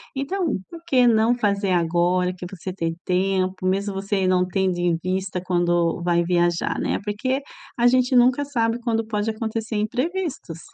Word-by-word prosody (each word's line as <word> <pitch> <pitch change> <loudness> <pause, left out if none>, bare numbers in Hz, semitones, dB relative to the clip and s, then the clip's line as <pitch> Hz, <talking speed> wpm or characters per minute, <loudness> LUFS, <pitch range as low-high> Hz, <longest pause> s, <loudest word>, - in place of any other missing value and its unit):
Então, 350 +8 -2 0.2
por 335 -1 -10
que 255 -6 +4
não 225 +1 +4
fazer 200 -4 0
agora 175 +1 +2
que 180 - -7
você 185 0 -7
tem 165 -3 -3
tempo, 185 0 0
mesmo 195 +2 0
você 195 -1 -1
não 180 0 +3
tendo 185 -1 0
em 175 -1 +1
vista 185 0 -2
quando 175 -2 +1
vai 170 -1 +2
viajar, 175 -1 +1
né? - - -1
Porque 255 +7 -1 0.4
a 240 0 +4
gente 255 +1 +3
nunca 255 +4 +4
sabe 230 -4 0
quando 225 -1 0
pode 215 0 -1
acontecer 220 0 -3
imprevistos. 255 - -3
200 Hz, 160 wpm, -23 LUFS, 180-240 Hz, 0.4 s, que